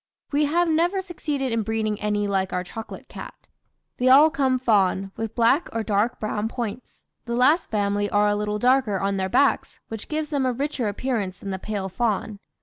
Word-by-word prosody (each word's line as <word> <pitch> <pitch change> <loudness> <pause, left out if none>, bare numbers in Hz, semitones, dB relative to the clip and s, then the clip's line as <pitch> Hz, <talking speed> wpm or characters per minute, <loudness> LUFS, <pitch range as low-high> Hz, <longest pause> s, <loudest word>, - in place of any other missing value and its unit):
"We 295 +1 +2
have 340 +4 +2
never 340 +4 +2
succeeded 300 -8 -3
in 230 0 +1
breeding 220 -1 -2
any 210 -1 0
like 190 -2 0
our 180 - -1
chocolate 220 +5 -9
cat; - - -11 0.5
they 255 +1 +2
all 290 +4 +7
come 270 -2 +1
fawn, 195 -5 +1
with 225 0 -5
black 240 +8 +3
or 225 -1 -1
dark 215 +2 0
brown 215 0 -2
points; 235 0 -6 0.2
the 235 -1 -2
last 290 +8 +3
family 205 -1 0
are 205 0 +3
a 205 - +2
little 210 0 -2
darker 245 -4 +2
on 195 +1 -1
their 190 0 -1
backs, 280 +7 +1
which 225 -1 -7
gives 310 0 -3
them 285 -2 0
a 255 -1 +1
richer 275 -2 -2
appearance 205 -3 -2
than 195 - -5
the 190 - -4
pale 200 -1 -3
fawn. 215 0 -2
225 Hz, 195 wpm, -24 LUFS, 205-270 Hz, 0.5 s, all